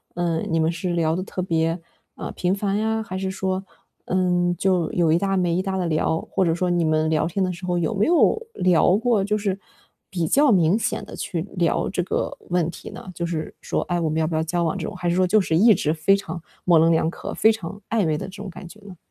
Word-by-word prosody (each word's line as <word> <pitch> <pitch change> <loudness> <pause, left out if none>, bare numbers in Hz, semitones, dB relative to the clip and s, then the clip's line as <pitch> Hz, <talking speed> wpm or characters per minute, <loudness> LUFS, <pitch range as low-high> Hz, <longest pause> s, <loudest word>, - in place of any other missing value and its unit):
嗯， 170 -2 -1
你 165 0 +1
们 160 +1 +2
是 175 +1 -3
聊 165 -1 +1
得 185 - -2
特 185 -1 -4
别， 165 0 0 0.4
嗯， - - -6
频 180 +2 0
繁 200 0 -1
呀？ 220 +1 0
还 185 -4 -7
是 190 0 -2
说， 190 0 -2 0.4
嗯， 180 -1 +1
就 185 -4 +1
有 170 -3 +2
一 170 - +3
搭 195 -1 0
没 175 -2 +1
一 185 - +1
搭 190 0 -2
地 180 - -1
聊？ 160 0 0
或 190 - -1
者 165 -1 +2
说 180 0 0
你 175 -1 +2
们 155 0 +2
聊 160 0 +1
天 190 +3 -1
的 185 -1 -1
时 170 +2 -12
候 180 -1 0
有 175 +6 0
没 205 +6 +1
有 350 +6 +4
聊 180 +1 +4
过 230 -4 +2
就 210 +1 0
是 200 -2 -2 0.5
比 170 -5 -1
较 285 - +4
明 175 -1 +4
显 - - -2
地 - - -10
去 170 -2 -3
聊 170 -1 +1
这 185 -2 -1
个 - - -2
问 175 -2 +1
题 - - -10
呢？ - - -10
就 170 0 -3
是 160 -2 -4
说， - - -1
哎， 175 0 -1
我 160 - 0
们 160 +1 -1
要 160 - +2
不 160 - -3
要 160 - +1
交 170 +2 -1
往 160 - 0
这 - - -4
种？ - - -7
还 175 - -3
是 170 - +1
说 185 0 +3
就 215 +3 +4
是 160 -4 0
一 215 +3 +6
直 155 0 0
非 165 +5 +3
常 175 -4 -6 0.2
模 170 -3 +5
棱 165 +1 +4
两 160 0 +2
可， - - -7
非 220 - +5
常 200 -1 -6
暧 215 -7 +1
昧 155 -1 +1
的 - - -5
这 195 +1 -11
种 205 - -6
感 175 0 -10
觉 210 - -14
呢？ 195 -4 -12
180 Hz, 285 characters per minute, -23 LUFS, 165-195 Hz, 0.5 s, 一